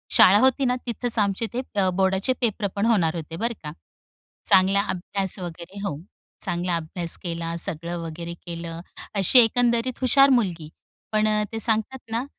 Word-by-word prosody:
शाळा 200 +3 +7
होती 265 +2 +3
ना 250 - +1
तिथेच 240 0 -3
आमचे 200 +2 0
ते 250 - -2
अ, 190 -2 +2
बोर्डाचे 190 +5 0
पेपर 215 -3 0
पण 200 +2 0
होणार 180 -8 +2
होते 165 0 -6
बरं 235 +5 -2
का. 150 - -6 0.8
चांगला 195 +2 +4
अभ्यास 190 +2 +1
वगैरे 175 +2 -8
हो 145 - -4 0.5
चांगला 175 -1 -1
अभ्यास 170 +1 0
केला 165 -1 -4
सगळं 170 +2 +1
वगैरे 170 +1 -7
केलं. 170 0 -6 0.3
अशी 200 +6 +5
एकंदरीत 240 +1 +2
हुशार 275 +2 +5
मुलगी. 180 - 0 0.4
पण 215 0 +2 0.2
ते 225 - -4
सांगतात 225 +4 +1
ना 230 +3 -2
195 Hz, 155 wpm, -23 LUFS, 170-230 Hz, 0.8 s, शाळा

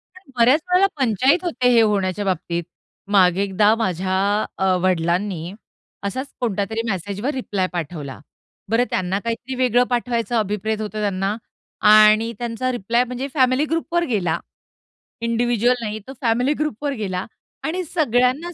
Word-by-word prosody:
कारण 370 -6 -18
बऱ्याच 255 +7 +5
वेळेला 365 +2 +5
पंचाईत 265 - +2
होते 255 -7 0
हे 230 - +6
होण्याच्या 205 -2 0
बाबतीत. 175 -2 -2 0.5
मागे 185 -2 +4
एकदा 205 +2 +3
माझ्या 190 -3 -1 0.4
अ, 190 -1 +2
वडिलांनी 180 0 0 0.5
असाच 260 +7 -3
कोणत्यातरी 220 -1 -1
मेसेजवर 205 - -3
रिप्लाय 205 -8 -2
पाठवला. 150 -5 -5 0.5
बरं, 225 +3 +3
त्यांना 185 +1 -1
काहीतरी 235 +4 -4
वेगळं 250 -1 +3
पाठवायचं 240 -1 -1
अभिप्रेत 215 +1 -1
होतं 215 0 -4
त्यांना 195 0 -1 0.6
आणि 215 +2 +6
त्यांचा 240 +2 -2
रिप्लाय 235 +1 +1
म्हणजे 250 +2 -5
फॅमिली 260 +1 +3
ग्रुपवर 330 +2 -1
गेला, 190 - 0 0.8
इंडिव्हिज्युअल 240 +1 +1
नाही. 215 0 -3
तो 265 - -7
फॅमिली 245 +4 +2
ग्रुपवर 290 -1 -2
गेला 190 -3 -3 0.4
आणि 360 +4 -2
सगळ्यांनाच 290 +1 +1
225 Hz, 135 wpm, -21 LUFS, 195-255 Hz, 0.8 s, हे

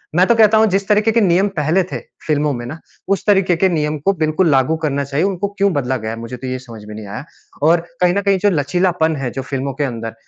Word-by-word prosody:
मैं 180 +2 +5
तो 235 - +4
कहता 220 -1 +5
हूँ 220 - +5
जिस 195 +1 0
तरीके 210 +1 +3
के 230 +1 +2
नियम 190 0 +3
पहले 155 +4 +2
थे - - -3 0.3
फ़िल्मों 150 -1 +1
में 120 -1 -5
ना, 155 +7 -7 0.3
उस 195 0 0
तरीके 195 -3 +3
के 190 +3 +3
नियम 155 -3 -1
को 195 - +4
बिल्कुल 160 +1 +1
लागू 135 +2 +2
करना 140 -2 0
चाहिए। 140 +3 -1
उनको 195 0 -1
क्यों 200 0 +2
बदला 130 -3 -1
गया 110 -2 -5
है? 115 - -6
मुझे 115 +2 -7
तो 130 - -7
ये 130 0 -3
समझ 115 -4 -12
में 105 - -9
नहीं 105 -1 -8
आया। 100 +6 -6 0.4
और 165 +1 +4 0.2
कहीं 180 -1 +4
न 200 - 0
कहीं 200 -1 +2
जो 205 - +3
लचीलापन 165 0 +1
है 135 -2 -3
जो 135 - -4
फ़िल्मों 135 +1 -3
के 145 +3 -2
अंदर, 115 -4 -4
155 Hz, 265 wpm, -18 LUFS, 135-190 Hz, 0.4 s, मैं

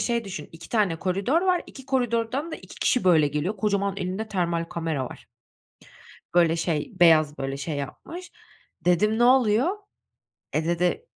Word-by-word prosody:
şey 235 -2 0
düşün, 185 -7 -7
2 165 0 -12
tane 205 -8 +1
koridor 195 - +1
var, 365 -2 +2
2 265 -1 -12
koridordan 255 +4 -1
da - - -3
2 - - -13
kişi 250 -7 +1
böyle 160 -5 +5
geliyor, 155 +9 -2
kocaman 200 -1 0
elinde 190 +4 -3
termal 170 -4 -1
kamera 165 -5 -3
var. - - -10 1.1
Böyle 170 -2 +4
şey, 165 -3 -2
beyaz, 155 -3 +5
böyle, 135 0 -3
şey 145 +2 -4
yapmış. 330 - -7 0.5
Dedim, 210 +5 +3
ne 240 - +3
oluyor? 245 0 +4 0.9
E, 155 +1 0
dedi 175 - 0
185 Hz, 155 wpm, -25 LUFS, 165-235 Hz, 1.1 s, böyle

